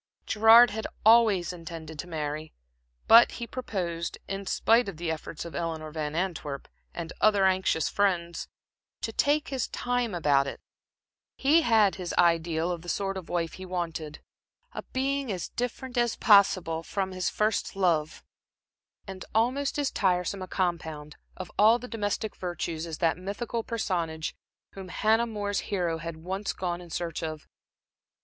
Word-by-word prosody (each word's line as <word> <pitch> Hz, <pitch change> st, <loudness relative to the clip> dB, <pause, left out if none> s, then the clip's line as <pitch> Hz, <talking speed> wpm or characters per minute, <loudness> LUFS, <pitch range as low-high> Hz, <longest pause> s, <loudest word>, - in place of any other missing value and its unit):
Gerard 225 Hz, +2 st, +7 dB
had 220 Hz, +1 st, -4 dB, 0.2 s
always 215 Hz, -6 st, +5 dB
intended 160 Hz, -2 st, -8 dB
to 180 Hz, -, -5 dB
marry, 155 Hz, -1 st, -4 dB, 0.5 s
but 230 Hz, +1 st, +8 dB
he 235 Hz, -, -5 dB
proposed, 180 Hz, -9 st, -4 dB
in 195 Hz, 0 st, -5 dB
spite 230 Hz, +2 st, +3 dB
of 180 Hz, -, -8 dB
the 165 Hz, 0 st, -2 dB
efforts 160 Hz, +1 st, -6 dB
of 170 Hz, -, -8 dB
Eleanor 160 Hz, -2 st, -4 dB
Van 150 Hz, -1 st, -4 dB
Antwerp 160 Hz, -6 st, -3 dB, 0.2 s
and 165 Hz, -1 st, -6 dB
other 205 Hz, -2 st, +4 dB
anxious 185 Hz, -4 st, +2 dB
friends, 175 Hz, -4 st, 0 dB, 0.5 s
to -, -, -3 dB
take 295 Hz, +1 st, +1 dB
his 265 Hz, -3 st, -2 dB
time 245 Hz, -4 st, -1 dB
about 145 Hz, -4 st, +3 dB
it. -, -, -6 dB, 0.8 s
He 300 Hz, +5 st, +4 dB
had 220 Hz, -8 st, +3 dB
his 175 Hz, -, -4 dB
ideal 165 Hz, 0 st, +2 dB
of 175 Hz, -2 st, -4 dB
the 175 Hz, -, -8 dB
sort 195 Hz, +1 st, -1 dB
of 185 Hz, -3 st, -7 dB
wife 170 Hz, -2 st, -1 dB
he 185 Hz, -, -9 dB
wanted 165 Hz, -4 st, -4 dB, 0.5 s
a -, -, -5 dB
being 270 Hz, -1 st, -1 dB
as 180 Hz, -3 st, -4 dB
different 245 Hz, +1 st, -4 dB
as 240 Hz, -1 st, +1 dB
possible 190 Hz, -6 st, +4 dB
from 190 Hz, +3 st, -3 dB
his 185 Hz, -1 st, -1 dB
first 215 Hz, -1 st, -1 dB
love, 165 Hz, -5 st, 0 dB, 0.8 s
and 190 Hz, -2 st, -8 dB
almost 260 Hz, +6 st, +1 dB
as 285 Hz, -2 st, 0 dB
tiresome 185 Hz, 0 st, 0 dB
a 185 Hz, -, -5 dB
compound 160 Hz, -5 st, -3 dB, 0.2 s
of 185 Hz, -, -7 dB
all 220 Hz, +3 st, +7 dB
the 245 Hz, +1 st, -9 dB
domestic 215 Hz, -2 st, -3 dB
virtues 170 Hz, -2 st, -4 dB
as 160 Hz, -2 st, -5 dB
that 165 Hz, 0 st, +1 dB
mythical 220 Hz, +5 st, -4 dB
personage 170 Hz, -9 st, -2 dB, 0.4 s
whom 190 Hz, -1 st, -9 dB
Hannah 220 Hz, +5 st, +2 dB
More's 205 Hz, -2 st, -2 dB
hero 175 Hz, -5 st, -1 dB
had 165 Hz, 0 st, -6 dB
once 190 Hz, +5 st, -3 dB
gone 175 Hz, -1 st, -3 dB
in 175 Hz, -, -12 dB
search 170 Hz, 0 st, -3 dB
of. 155 Hz, -1 st, -5 dB
185 Hz, 155 wpm, -28 LUFS, 165-220 Hz, 0.8 s, but